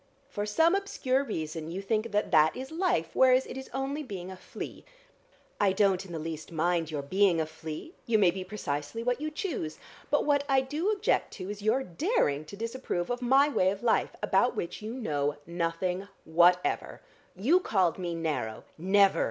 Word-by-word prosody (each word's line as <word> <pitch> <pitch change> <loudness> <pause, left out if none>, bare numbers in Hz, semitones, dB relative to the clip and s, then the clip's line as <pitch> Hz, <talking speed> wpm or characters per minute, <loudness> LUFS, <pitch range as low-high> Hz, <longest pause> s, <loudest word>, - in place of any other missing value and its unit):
For 205 -6 -3
some 325 - +4
obscure 280 -9 0
reason 160 - -4
you 175 +3 -4
think 215 +3 -1
that 210 0 0
that 155 0 +5
is 265 +2 -6
life, 325 - 0
whereas 260 0 +5
it - - -8
is 265 0 -7
only 270 +3 -2
being 190 -9 -6
a - - -7
flea. 185 - -8 0.8
I 200 -2 +3
don't 195 -1 +2
in 190 - -11
the 165 - -4
least 160 0 -6
mind 165 0 0
your 150 -3 -3
being 185 +3 +3
a 160 - +1
flea, 160 - -8
you 230 -2 +4
may 190 -4 +5
be 185 +1 -5
precisely 180 0 -4
what 245 +3 0
you 310 - -1
choose. 300 - -4 0.3
But 295 - +2
what 285 -1 +3
I 270 -1 +4
do 300 +9 -2
object 425 -2 +1
to 190 0 -6
is 205 0 -7
your 225 +6 +2
daring 170 - 0
to 200 - -10
disapprove 230 -5 -3
of 245 +1 -2
my 270 +4 +5
way 190 -10 +2
of 200 +3 -4
life, 230 - +2
about - - +3
which 170 - -4
you 220 +3 -5
know 145 - -1
nothing 175 +3 -2 0.2
whatever. 175 +2 +2 0.3
You 265 - +4
called 190 - +1
me 175 -2 -3
narrow 150 -9 -3
" - - -33
"Never!" 195 +3 +4
200 Hz, 195 wpm, -29 LUFS, 165-260 Hz, 0.8 s, that